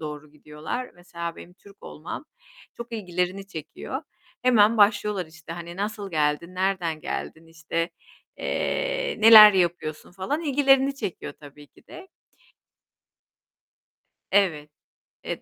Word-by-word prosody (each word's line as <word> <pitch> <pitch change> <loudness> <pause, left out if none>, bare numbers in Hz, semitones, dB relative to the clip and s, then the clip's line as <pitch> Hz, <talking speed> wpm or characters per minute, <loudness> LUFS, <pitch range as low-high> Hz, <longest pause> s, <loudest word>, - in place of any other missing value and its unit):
doğru 150 -1 -7
gidiyorlar. 150 - -6
Mesela 170 -1 -7
benim 175 - -12
Türk 200 +1 -19
olmam 160 - -8 0.5
çok 235 0 -9
ilgilerini 185 -1 -3
çekiyor. 195 - -7 0.4
Hemen 230 -3 +4
başlıyorlar, 210 -3 +2
işte, 165 +1 -11
hani, 170 0 -8
"Nasıl 205 0 -4
geldin? 155 +3 -1
Nereden 185 -4 -1
geldin?" 160 +1 -6
İşte, 165 +1 -3 0.5
eee, - - -2
"Neler 215 -1 +10
yapıyorsun?" 175 -4 -1
falan 195 - -3
ilgilerini 275 -2 +3
çekiyor 195 -9 -6
tabii 145 0 -14
ki - - -25
de. 375 +2 -12 2.2
Evet. 165 -7 +2 0.5
Eee, - - -5
185 Hz, 115 wpm, -25 LUFS, 165-215 Hz, 2.2 s, Neler